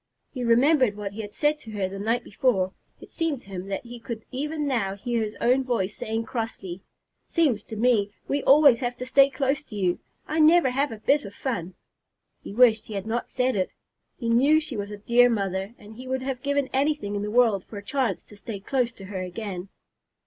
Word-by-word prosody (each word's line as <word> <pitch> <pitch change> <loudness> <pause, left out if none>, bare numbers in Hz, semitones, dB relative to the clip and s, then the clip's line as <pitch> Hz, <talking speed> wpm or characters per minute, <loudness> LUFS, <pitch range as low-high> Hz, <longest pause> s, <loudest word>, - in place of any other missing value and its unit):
He 255 -3 -4
remembered 245 -1 +4
what 205 -1 -4
he 215 +2 -6
had 205 -1 -8
said 300 +4 +1
to 225 - -12
her 200 -2 -1
the 195 +1 -7
night 225 +4 0
before. 195 -4 0 0.3
It - - -14
seemed 320 -6 -1
to - - -18
him 190 0 -6
that 195 - -3
he 240 0 -9
could 230 -1 -7
even 295 +3 -2
now 225 -8 0
hear 235 +3 -2
his 215 0 -4
own 255 +3 +3
voice 225 -6 -1
saying 225 +1 -2
crossly, 220 -6 -5 0.5
"Seems 285 - +2
to 220 - -7
me 220 -2 +2 0.2
we 280 +1 0
always 280 -3 +6
have 245 -1 -3
to 250 - -5
stay 275 +1 +5
close 275 0 0
to 240 - -12
you. 185 -3 0 0.3
I 315 - -1
never 315 -3 +6
have 275 +3 0
a 225 - -6
bit 280 +7 +2
of 200 -1 -9
fun!" 185 -9 -3 0.7
He - - -8
wished 225 0 +4
he 215 - -6
had 195 0 -3
not 230 +2 -2
said 255 -1 0
it. 185 -2 0 0.5
He 235 - -4
knew 270 +7 +5
she 300 -5 -5
was 205 -1 -4
a 210 - -7
dear 240 +4 +4
mother, 195 -1 -2
and 210 +1 -13
he 255 +1 -9
would 260 0 -2
have 260 -2 -3
given 285 0 0
anything 275 -6 0
in 200 - -1
the 210 - -3
world 220 -4 +3
for 215 - -10
a 200 - -7
chance 255 -9 -1
to 210 - -16
stay 205 0 -7
close 245 +4 0
to 195 - -11
her 190 -1 -5
again. 185 0 -5
235 Hz, 225 wpm, -25 LUFS, 205-265 Hz, 0.7 s, always